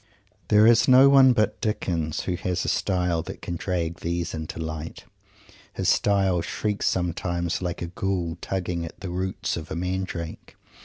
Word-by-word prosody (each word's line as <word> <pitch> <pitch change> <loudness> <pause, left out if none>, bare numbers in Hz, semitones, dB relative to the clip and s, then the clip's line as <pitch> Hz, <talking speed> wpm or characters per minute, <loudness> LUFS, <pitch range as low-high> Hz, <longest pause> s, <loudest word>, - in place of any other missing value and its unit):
There 105 0 +5
is 115 0 +5
no 130 +2 +8
one 135 -2 +7
but 110 -4 0
Dickens 85 -7 -1
who 90 - -2
has 90 0 -2
a - - -3
style 90 -4 0
that - - -9
can 85 - -3
drag 85 -1 -2
these 85 0 -2
things 80 - -4
into 80 - -7
light. 80 0 -6 0.7
His - - 0
style 95 -3 +2
shrieks 105 +4 -2
sometimes 85 -1 -1
like 90 -1 -3
a - - -2
ghoul 90 -1 -2
tugging 90 -3 -3
at 80 - -9
the 95 -3 -5
roots 95 +1 -2
of 80 -1 -7
a - - -4
mandrake. 90 -2 -4
90 Hz, 170 wpm, -25 LUFS, 85-95 Hz, 0.7 s, no